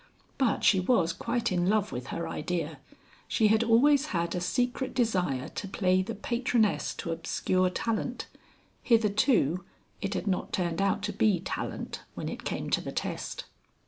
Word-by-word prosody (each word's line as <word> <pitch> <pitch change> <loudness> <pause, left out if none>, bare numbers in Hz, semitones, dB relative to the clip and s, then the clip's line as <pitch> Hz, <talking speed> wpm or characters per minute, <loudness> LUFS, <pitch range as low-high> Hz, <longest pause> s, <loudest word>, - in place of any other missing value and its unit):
But 260 -5 +2
she 190 - +5
was 180 -4 +2
quite 235 +4 -1
in 180 0 +1
love 210 -1 +2
with 125 +1 -5
her 170 0 -3
idea 160 -2 -3 0.5
she 215 -2 +3
had 220 +1 +4
always 275 +6 +4
had 170 - -1
a 180 - -2
secret 245 +7 -1
desire 180 - +1
to 200 - -5
play 185 -1 +2
the 220 +5 -4
patroness 235 0 0
to 165 - -4
obscure 185 +3 0
talent. 230 +6 -2 0.6
Hitherto 215 - +3 0.4
it 200 0 -2
had - - -2
not 190 -3 -1
turned 175 -1 0
out 200 +1 +1
to - - -2
be 205 -5 +3
talent 180 - -4
when - - -4
it - - -7
came - - -3
to - - +2
the - - -5
test. - - -4
195 Hz, 165 wpm, -29 LUFS, 180-230 Hz, 0.6 s, she